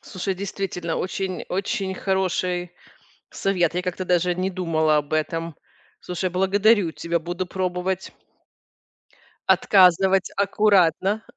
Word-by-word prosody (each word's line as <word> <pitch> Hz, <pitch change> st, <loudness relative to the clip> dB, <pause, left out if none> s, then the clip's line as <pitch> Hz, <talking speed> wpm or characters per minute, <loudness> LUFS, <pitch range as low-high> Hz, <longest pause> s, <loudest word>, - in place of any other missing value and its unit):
Слушай, 190 Hz, +1 st, -4 dB
действительно 185 Hz, -3 st, -4 dB
очень 185 Hz, 0 st, -3 dB
очень 195 Hz, 0 st, -2 dB
хороший 185 Hz, -2 st, -1 dB, 0.6 s
совет. 175 Hz, -4 st, 0 dB
Я 180 Hz, -, -1 dB
как-то 180 Hz, 0 st, -3 dB
даже 180 Hz, 0 st, +2 dB
не 185 Hz, +2 st, -1 dB
думала 160 Hz, -4 st, +1 dB
об 150 Hz, +1 st, -2 dB
этом. 165 Hz, +1 st, -2 dB, 0.4 s
Слушай, 180 Hz, +1 st, -3 dB
благодарю 195 Hz, +1 st, +3 dB
тебя. 170 Hz, +1 st, -2 dB
Буду 175 Hz, +3 st, -4 dB
пробовать 185 Hz, 0 st, -3 dB, 1.4 s
отказывать 190 Hz, 0 st, +4 dB
аккуратно. 200 Hz, 0 st, +2 dB
185 Hz, 105 wpm, -23 LUFS, 175-190 Hz, 1.4 s, отказывать